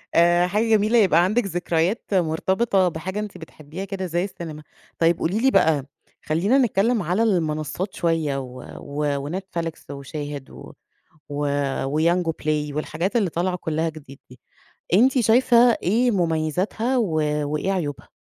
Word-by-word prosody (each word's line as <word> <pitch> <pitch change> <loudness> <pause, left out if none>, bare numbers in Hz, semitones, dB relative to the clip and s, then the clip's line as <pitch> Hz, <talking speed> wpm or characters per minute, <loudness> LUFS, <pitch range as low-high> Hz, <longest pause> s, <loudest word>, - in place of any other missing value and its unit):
آآ، 175 +1 +4
حاجة 210 +5 0
جميلة 220 +2 +3
يبقى 175 -6 +5
عندِك 215 +4 +1
ذكريات 175 +2 -1
مرتبطة 190 +3 +1
بحاجة 185 +6 -5
أنتِ 210 -3 -6
بتحبيها 160 +2 -9
كده 195 -2 -4
زي 175 +1 -1
السينما. 160 -6 -7 0.4
طيب 165 0 +3
قولي 190 +7 0
لي 265 +2 +3
بقى 150 -4 +3 0.4
خلّينا 180 - +2
نتكلم 230 -3 +2
على 180 +7 +1
المنصّات 165 -2 -1
شوية 160 -5 0
و 130 -1 -8 0.2
و 145 0 -3
وNetflix 175 -2 -3 0.2
وShahid 145 0 -7
و - - -11 0.6
و 145 0 -2 0.4
وYango 165 +4 +1
Play 150 -1 -1
والحاجات 165 +8 -2
اللي 200 -6 +1
طالعة 180 +2 -1
كلّها 160 -1 -2
جديد 145 -4 -11
دي، 125 -2 -15 0.5
أنتِ 255 +6 +4
شايفة 240 +2 +4 0.3
إيه 235 +7 +2
مميزاتها 180 - 0
و 200 -9 0 0.4
وإيه 170 +6 -1
عيوبها؟ 150 -7 -4
175 Hz, 140 wpm, -23 LUFS, 155-200 Hz, 0.6 s, يبقى